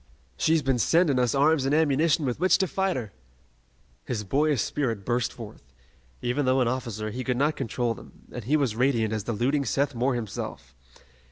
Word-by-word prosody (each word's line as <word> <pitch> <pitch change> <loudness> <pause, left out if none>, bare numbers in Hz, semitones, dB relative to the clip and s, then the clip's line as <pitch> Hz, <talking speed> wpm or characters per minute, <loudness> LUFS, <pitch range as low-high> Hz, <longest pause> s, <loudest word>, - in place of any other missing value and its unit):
She's 160 -1 +2
been 130 -2 +1
sending 150 - +3
us 125 0 +1
arms 145 +1 +3
and 135 +2 +1
ammunition 155 0 +2
with 125 +1 -2
which 185 0 +4
to 190 - +1
fight 190 +1 -1
her!" 110 -6 -5 0.9
His 110 -3 -3
boyish 145 +7 +1
spirit 130 -9 -2
burst 120 0 0
forth. 115 -4 -10 0.6
Even 130 +3 0
though 130 +1 +3
an 125 - +2
officer, 115 -4 -3
he 125 +4 -4
could 125 -1 -1
not 150 +4 +1
control 120 -2 -1
them, - - -15
and 120 -4 -7
he 150 +6 +3
was 130 -7 0
radiant 115 -3 +1
as 105 -2 -3
the 120 - -2
looting 135 +7 +1
Seth 140 +1 0
Moore 125 +2 0
himself. 105 - -6
130 Hz, 190 wpm, -26 LUFS, 120-145 Hz, 0.9 s, which